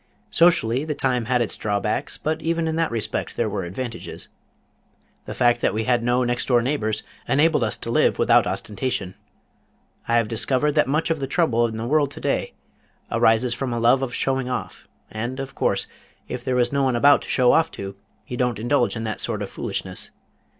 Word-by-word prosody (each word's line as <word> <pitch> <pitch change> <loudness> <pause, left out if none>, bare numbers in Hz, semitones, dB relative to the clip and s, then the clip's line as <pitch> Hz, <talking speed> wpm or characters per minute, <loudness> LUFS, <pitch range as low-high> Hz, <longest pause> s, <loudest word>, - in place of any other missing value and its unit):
Socially 150 -7 +3
the 155 -1 -3
time 125 -4 0
had 125 0 +2
its 115 - -4
draw 105 -1 -1
backs, 105 - -2
but 155 +1 -2
even 165 0 0
in 160 - -1
that 165 0 +1
respect 110 -2 -3
there 115 - +1
were 100 -3 -3
advantages. 115 +6 -6 1.0
The - - -6
fact 120 0 +3
that - - +1
we 110 - 0
had 120 +1 +2
no 120 +2 +2
next 120 0 -1
door 120 -2 +3
neighbors 110 -5 -1 0.2
enabled 150 -1 +3
us 110 - -1
to 115 - -5
live - - +3
without - - +4
ostentation. 100 -3 -3 0.9
I 115 - +2
have 115 -2 +3
discovered 130 +6 +1
that 150 -2 +2
much 155 +4 0
of 160 - 0
the 135 - -3
trouble 125 -7 +2
in 110 -1 -6
the 110 - -3
world 145 +2 +2
to - - -4
day - - -1 0.6
arises 115 +2 +3
from 130 0 -3
a 120 - -1
love 120 +3 +4
of 130 -2 -3
showing 130 -1 0
off, 125 - -5 0.2
and 120 +5 -4
of 135 0 -5
course, - - 0 0.4
if 125 - -5
there 130 0 0
is 120 +1 +1
no 140 - +2
one 130 -2 +2
about 140 +4 +5
to - - -10
show 125 -1 +4
off 160 0 +3
to, 95 0 -6 0.3
you 125 - -6
don't 125 -2 0
indulge 120 +3 +1
in 110 - -4
that 110 -1 -3
sort 105 -3 -2
of 100 - -7
foolishness. - - -4
125 Hz, 205 wpm, -23 LUFS, 115-135 Hz, 1.0 s, about